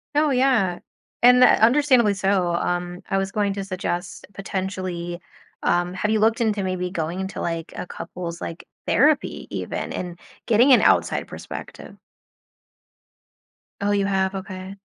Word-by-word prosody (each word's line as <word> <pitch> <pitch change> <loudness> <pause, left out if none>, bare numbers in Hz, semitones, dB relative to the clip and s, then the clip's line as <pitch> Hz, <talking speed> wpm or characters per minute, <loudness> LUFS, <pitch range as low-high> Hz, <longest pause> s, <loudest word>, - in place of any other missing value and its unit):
Oh, 300 +1 +3
yeah, 250 -9 +2 0.4
and, 250 +1 +7
uh, - - +9
understandably 245 -3 +4
so, 190 -2 +1
um, 175 +1 -2
I 195 - +1
was 195 0 -1
going 205 -1 0
to 195 0 -4
suggest 180 -2 -4
potentially, 185 -2 -4 0.4
um 175 +1 +1
have 200 +3 -2
you 220 0 +2
looked 225 +3 +2
into 210 -3 +1
maybe 185 -1 -2
going 170 0 -3
into, 190 +1 -5
like, 165 -1 -3
a - - -5
couple's, 170 -1 -7
like, 165 - -7 0.2
therapy 290 +5 +2
even - - -4
and 175 -1 -5 0.3
getting 240 +4 +5
an - - +6
outside - - +2
perspective? - - -9 1.8
Oh, 205 0 0
you 200 -1 +1
have? 190 -1 0
Okay. 190 0 -7
195 Hz, 145 wpm, -23 LUFS, 180-215 Hz, 1.8 s, uh